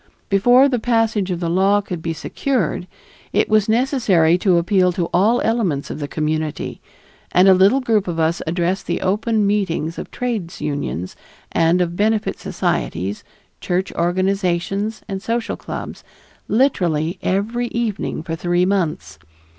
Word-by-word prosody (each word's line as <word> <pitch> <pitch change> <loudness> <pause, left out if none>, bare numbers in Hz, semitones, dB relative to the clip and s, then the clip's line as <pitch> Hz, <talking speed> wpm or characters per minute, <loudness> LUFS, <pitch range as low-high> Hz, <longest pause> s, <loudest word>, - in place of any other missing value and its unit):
Before 245 +7 +5
the 250 -3 0
passage 225 -4 +1
of 175 -2 -2
the 170 - -2
law 195 +4 +3
could 185 -4 -5
be 165 - -2
secured, 185 - -2 0.5
it - - +2
was 215 -1 +3
necessary 220 - +3
to 180 -2 +3
appeal 180 +1 +3
to 170 -1 -2
all 215 +7 +3
elements 200 -12 0
of - - -6
the 145 - -3
community, 155 0 -3 0.5
and 180 +2 +5
a 190 - +8
little 195 +9 +4
group 220 -6 +1
of 165 -2 -3
us 160 +1 +1
addressed 175 +3 -1
the - - -1
open 210 +3 +1
meetings 185 -6 -1
of - - -7
trades 225 -9 -4
unions 140 - -3 0.4
and 165 +2 +3
of 170 -1 -1
benefit 215 +2 0
societies, 95 +5 -2 0.4
church 185 +2 -2
organizations, 185 +3 -1
and 195 -2 -4
social 230 +1 -2
clubs - - -7 0.4
literally 175 - +1
every 225 +6 -1
evening 230 -9 -3
for 165 0 -4
three 175 +2 +1
months. 170 - -2
190 Hz, 145 wpm, -20 LUFS, 170-220 Hz, 0.5 s, a